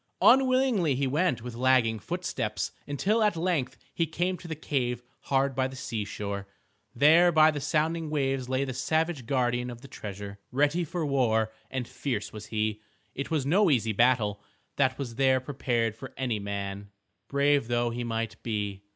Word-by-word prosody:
Unwillingly 255 - +4
he 135 +2 0
went 140 -3 +1
with 125 -1 -6
lagging 120 -2 +3
footsteps - - -3 0.2
until 200 +11 +1
at 210 -4 +3
length 165 -6 -1 0.2
he 165 - 0
came 175 +4 -1
to 175 - -11
the 160 - -4
cave 125 -5 -2 0.2
hard 135 0 +1
by 130 0 +1
the 130 - -9
seashore. 105 -5 -4 0.5
There 160 +7 +6
by 155 -1 +6
the 145 -2 -4
sounding 160 +2 0
waves 135 -4 -1
lay 130 +1 +1
the 130 - -4
savage 155 0 -1
guardian 125 -2 0
of 120 -1 -9
the 135 - -11
treasure. 100 -3 -8
Ready 145 +6 +2
for 165 +1 -3
war 115 -6 +2 0.2
and 130 -2 -3
fierce 120 -7 -3
was 105 -1 -8
he. 110 -1 -1 0.3
It 140 - -4
was 155 -5 0
no 185 +6 +4
easy 115 -6 +2
battle 110 -3 +2 0.3
that 130 -2 +2
was 120 -5 -5
there 130 -1 +4
prepared 120 -4 -1
for 135 +4 -10
any 120 -5 -1
man, 100 0 -5 0.4
brave 140 -2 +2
though 120 0 +1
he 120 +1 -3
might 115 -2 -3
be. 105 -3 -3
130 Hz, 170 wpm, -28 LUFS, 115-150 Hz, 0.5 s, There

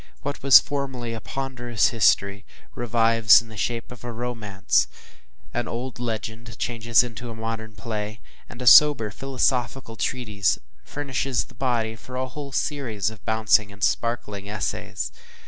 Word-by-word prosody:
What 145 0 -4
was 135 -1 +9
formerly 130 -5 -4
a 115 - -6
ponderous 120 -4 -1
history, 100 -2 +2 0.3
revives 115 -1 +5
in 115 -2 -10
the 110 - -11
shape 115 +4 -3
of 125 -2 -11
a 120 - -5
romance 100 - 0 0.7
an 120 -1 -2
old 120 +1 -5
legend 115 -1 -5
changes 115 -1 +2
into 120 0 -7
a 115 - -7
modern 110 0 -5
play 110 -1 -5 0.3
and 120 +1 -8
a - - -5
sober 125 -5 +7
philosophical 125 -1 -1
treatise 105 -5 0 0.3
furnishes 135 - -2
the - - -18
body 120 -4 -1
for 125 +3 -11
a 130 0 -2
whole 140 +1 -8
series 120 -8 -1
of 110 -3 -14
bouncing 110 -2 +2
and 100 0 -9
sparkling 105 -4 -1
essays. 65 - -3
115 Hz, 145 wpm, -24 LUFS, 110-125 Hz, 0.7 s, was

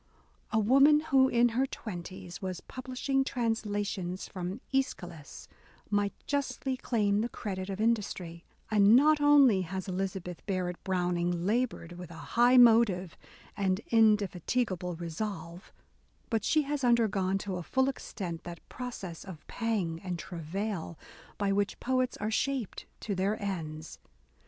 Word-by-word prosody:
A 220 - +1
woman 275 +7 +6
who 270 -4 +4
in 240 -1 +3
her 255 +4 +1
twenties 185 -5 -7
was 185 -2 -4
publishing 260 +1 -2
translations 205 -7 -2
from 185 +3 -5
^schylus, 175 - -3 0.4
might 205 -1 +1
justly 280 -2 -1
claim 210 -5 +1
the 235 - -1
credit 190 -5 -5
of 195 0 -4
industry; 190 -7 -1 0.3
and 210 +1 +6
not 300 +3 +5
only 280 -9 +6
has 190 +2 -5
Eliza 190 +1 -2
beth 180 -1 -9
Barrett 180 -3 -2
Browning 175 -2 0
laboured 225 -5 0
with 180 - -8
a 170 - -10 0.2
high 245 +2 +6
motive 220 -8 +5 0.4
and 190 -2 +1
indefatigable 205 -3 +2
resolve, 170 0 -6 0.3
— - - -38
but 225 -3 +1
she 310 +8 +3
has 285 0 -3
undergone, 210 -6 +2
to 195 -1 -4
a - - -4
full 265 +9 +1
extent, 185 -10 -5
that 170 -1 -9
process 210 -9 -6
of 185 -6 -10
pang 200 -8 -2
and 180 -2 -3
travail, 170 +1 -4 0.4
by 200 -1 0
which 200 +1 0
poets 255 0 0
are 215 +1 -2
shaped 260 -2 -2
to 210 - -2
their 195 +3 0
ends. 160 -6 -5
200 Hz, 140 wpm, -30 LUFS, 180-240 Hz, 0.4 s, woman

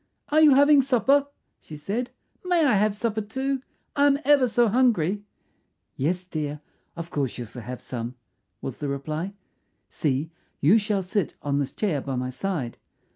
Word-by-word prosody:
"Are 310 +1 +4
you 295 -4 +7
having 285 +1 +6
supper?" 275 +2 +3 0.3
she 155 - -10
said. 210 +11 -3 0.3
"May 355 -3 +3
I 270 - +4
have 210 +1 +2
supper 220 -1 -1
too? 265 +5 -2 0.3
I 285 0 +5
am 280 -1 +4
ever 280 -3 +5
so 240 0 +3
hungry." 210 -5 +2 0.7
"Yes, 175 +7 -1
dear; 150 -4 -4 0.4
of 170 0 -7
course 140 -4 -2
you 120 - -5
shall 120 +3 -9
have 125 +2 -7
some," 120 0 -5 0.5
was - - -5
the 145 - -3
reply. 155 +7 -4 0.5
"See, 150 +2 -1 0.3
you 190 +10 +5
shall 205 -2 -1
sit 190 -1 -1
on 140 -1 0
this 140 -1 -2
chair 175 -10 -1
by 135 -1 -4
my 125 0 -2
side. 145 -5 -3
195 Hz, 170 wpm, -25 LUFS, -, 0.7 s, you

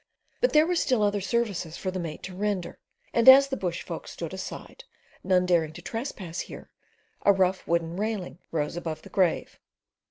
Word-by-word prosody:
But - - +3
there 305 +1 +6
were 360 - 0
still 255 -10 +2
other 205 0 +1
services 195 -5 -1
for 185 - -3
the 185 - -4
mate 165 -3 -6
to 185 - -7
render 200 -2 -2 0.3
and 235 +2 +7
as 275 +1 +9
the 270 - -1
bush 180 -7 -3
folk - - -7
stood - - -6
aside, - - -7 0.4
none 185 -1 +3
daring 165 -3 +2
to - - -10
trespass 210 - -5
here, - - -8 0.5
a 200 - +6
rough 190 -1 +1
wooden 170 0 0
railing 205 -5 -3
rose 150 -1 -1
about 165 -2 -5
the 195 - -12
grave. 185 -3 0
190 Hz, 185 wpm, -27 LUFS, 170-225 Hz, 0.5 s, as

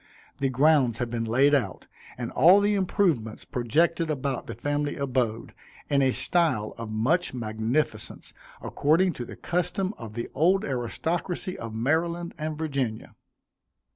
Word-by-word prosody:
The 135 - +1
grounds 130 -3 +3
had 120 -1 -3
been 115 -1 -2
laid 135 +6 +3
out, 120 -10 0 0.3
and 120 -2 -4
all 180 +5 +6
the 205 +1 +2
improvements 175 - 0
projected 160 +7 +1
about 140 -3 -2
the - - -6
family 145 0 -2
abode, 125 -5 -2 0.4
in 140 -1 +4
a 135 - +4
style 130 -5 +1
of 115 -1 -7
much 130 +9 0
magnificence, 115 +5 -2 0.3
according 170 +5 +2
to 120 - -6
the - - -9
custom 180 +3 -1
of 110 -2 -8
the 120 +1 -4
old 180 +7 +3
aristocracy 165 +8 -3
of 115 -1 -7
Maryland 170 +8 0
and 155 0 -3
Virginia. 135 -8 -3
140 Hz, 140 wpm, -26 LUFS, 120-170 Hz, 0.4 s, all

